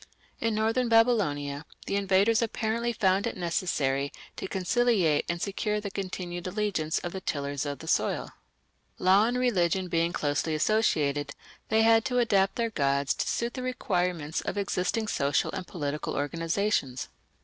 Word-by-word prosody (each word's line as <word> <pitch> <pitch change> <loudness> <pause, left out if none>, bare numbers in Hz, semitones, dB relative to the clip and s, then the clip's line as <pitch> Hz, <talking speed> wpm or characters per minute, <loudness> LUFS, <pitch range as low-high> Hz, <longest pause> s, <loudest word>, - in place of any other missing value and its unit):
In 230 -1 0
northern 225 +3 +1
Babylonia 165 -12 +2 0.2
the - - -2
invaders 200 +3 +3
apparently 230 +1 -1
found 200 -1 +2
it 235 - -4
necessary 145 -6 0 0.2
to - - -5
conciliate 190 -4 +2
and 170 0 -1
secure 210 +2 -1
the 205 -1 -5
continued 180 -2 -5
allegiance 185 -6 -1
of 175 - -4
the 190 - -6
tillers 145 -3 -2
of 145 0 -3
the - - -11
soil. - - 0 0.7
Law 195 +4 +4
and 245 +1 0
religion 190 -7 +1
being 165 0 +1
closely 145 0 -1
associated, 150 -7 +1 0.3
they 220 0 +4
had 225 0 +5
to 250 -1 0
adapt 200 -5 +3
their 230 -1 -1
gods 140 -4 +1
to - - -3
suit 235 +1 -1
the 255 - -5
requirements 180 -11 -1
of - - -4
existing 200 +2 -1
social 140 -7 +1
and 185 -3 -5
political 150 -3 -3
organizations. 165 - -1
190 Hz, 150 wpm, -28 LUFS, 155-220 Hz, 0.7 s, had